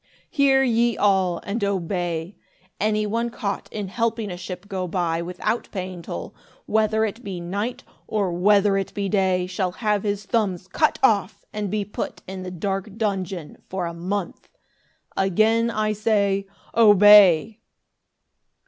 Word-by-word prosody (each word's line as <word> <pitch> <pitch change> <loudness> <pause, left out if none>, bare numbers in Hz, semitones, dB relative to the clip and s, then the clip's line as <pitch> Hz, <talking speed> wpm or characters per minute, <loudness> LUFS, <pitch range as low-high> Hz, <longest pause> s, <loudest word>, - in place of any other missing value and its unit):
"Hear 275 -4 +4
ye 235 -2 +2
all 190 -4 +2
and 205 +2 -3
obey. 175 -2 -2 0.4
Any 215 0 +1
one 230 +3 -1
caught 205 -4 -4
in 205 -2 -4
helping 230 -1 -1
a - - -4
ship 180 +2 -8
go 185 -2 -3
by 170 -1 -1
without 180 +6 -3
paying 185 -3 -5
toll, 85 - -7 0.3
whether 220 0 +2
it 220 +3 -6
be 190 -4 -5
night, 200 +8 -4 0.2
or 205 -4 0
whether 200 +2 +3
it 195 - -4
be 200 -1 -1
day, 190 -3 +1
shall 185 0 -2
have 210 -1 0
his 205 -1 -2
thumbs 195 -5 -1
cut 305 +11 +1
off 205 -4 +2
and 210 -1 -3
be 205 +1 -1
put 205 - -6
in 190 0 -6
the 185 - -5
dark 195 +3 -4
dungeon 190 -6 -3
for 185 -1 -2
a 170 - -4
month. 185 +3 -4 0.7
Again 220 +5 +2
I 215 -1 0
say, 200 -2 +1 0.3
Obey!" 205 -3 +7
200 Hz, 150 wpm, -23 LUFS, 185-215 Hz, 0.7 s, Obey